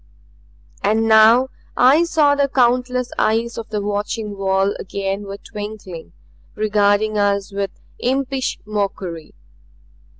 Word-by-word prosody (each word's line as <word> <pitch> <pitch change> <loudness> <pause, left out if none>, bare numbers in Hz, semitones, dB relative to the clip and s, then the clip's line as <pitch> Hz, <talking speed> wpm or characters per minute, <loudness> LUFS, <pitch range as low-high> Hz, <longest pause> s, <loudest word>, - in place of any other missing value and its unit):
And 220 +2 +2
now 225 +4 +6 0.3
I 280 +7 +5
saw 305 -4 +3
the 285 -1 +2
countless 250 -1 +1
eyes 230 +2 +1
of 225 - -8
the 210 -1 -2
watching 205 +1 -3
wall 195 0 +1
again 195 +1 -4
were 195 0 -6
twinkling, 205 -6 -8 0.4
regarding 210 0 +2
us 200 0 0
with 200 0 -2 0.3
impish 265 +1 -1
mockery. 195 -6 -4
215 Hz, 110 wpm, -20 LUFS, 200-245 Hz, 0.4 s, now